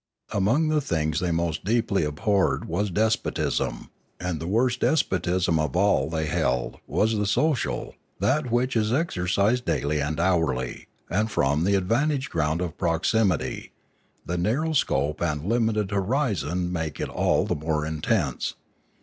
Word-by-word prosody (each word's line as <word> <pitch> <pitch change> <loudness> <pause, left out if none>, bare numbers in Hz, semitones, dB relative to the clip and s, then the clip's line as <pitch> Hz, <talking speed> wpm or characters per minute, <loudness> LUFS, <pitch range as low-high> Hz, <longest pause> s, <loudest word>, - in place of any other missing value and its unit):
Among 125 +11 +2
the 155 -1 +2
things 80 - -1
they 90 - -1
most 85 -1 -1
deeply 110 -2 +1
abhorred 95 +7 +1
was 100 +5 -1
despotism. 110 +5 -1 0.3
And 90 -3 -3
the 80 - -5
worst 120 +5 +1
despotism 90 - +1
of 75 -4 -1
all, 90 -7 +3
they 80 -1 -1
held, 60 -4 -1
was 110 +1 +1
the 105 -1 0
social, 150 +6 0 0.3
that 125 +8 +1
which 125 +2 +1
is 110 -1 +1
exercised 110 - +1
daily 75 -8 0
and 75 +2 -2
hourly, 80 -9 0 0.2
and 105 +3 0
from 75 -3 +1
the 100 0 +3
vantage 135 +8 0
ground 80 0 0
of 85 -2 -4
proximity; 90 +2 0 0.5
the 90 +1 -2
narrow 135 - 0
scope 75 - 0
and 75 -3 -1
limited 110 -2 +1
horizon 95 - 0
make 80 -4 -3
it - - -1
all - - +1
the - - 0
more 75 0 -1
intense. 80 - -1
90 Hz, 145 wpm, -25 LUFS, 80-110 Hz, 0.5 s, all